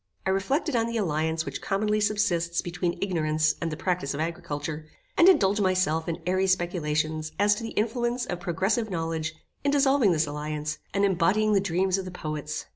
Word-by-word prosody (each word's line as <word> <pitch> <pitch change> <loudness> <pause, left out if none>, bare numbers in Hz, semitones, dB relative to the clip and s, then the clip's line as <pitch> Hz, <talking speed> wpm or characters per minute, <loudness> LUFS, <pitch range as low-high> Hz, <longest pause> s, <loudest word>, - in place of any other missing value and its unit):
I 190 - +2
reflected 245 - 0
on 230 -1 +2
the 235 0 -2
alliance 160 -4 0
which - - -5
commonly 210 +2 0
subsists 205 -5 +1
between 175 0 -2
ignorance 155 -4 +1
and 165 -1 -1
the 155 - -4
practice 175 -7 -1
of - - -5
agriculture, 155 -1 -4 0.3
and 345 - +7
indulged 205 - +4
myself 185 -4 +1
in 165 0 -4
airy 185 +1 +1
speculations 155 -4 0
as 205 +1 +4
to 210 - -5
the 225 - -4
influence 240 +3 0
of 175 - -4
progressive 190 +6 0
knowledge 165 -2 -2 0.3
in 285 - +2
dissolving 275 -6 +4
this 160 -1 +2
alliance, 150 +1 -4
and 200 0 +2
embodying 200 +3 +2
the 200 - +5
dreams 190 +1 +1
of 190 - -5
the - - -5
poets. 155 -3 -5
180 Hz, 185 wpm, -27 LUFS, 160-205 Hz, 0.3 s, and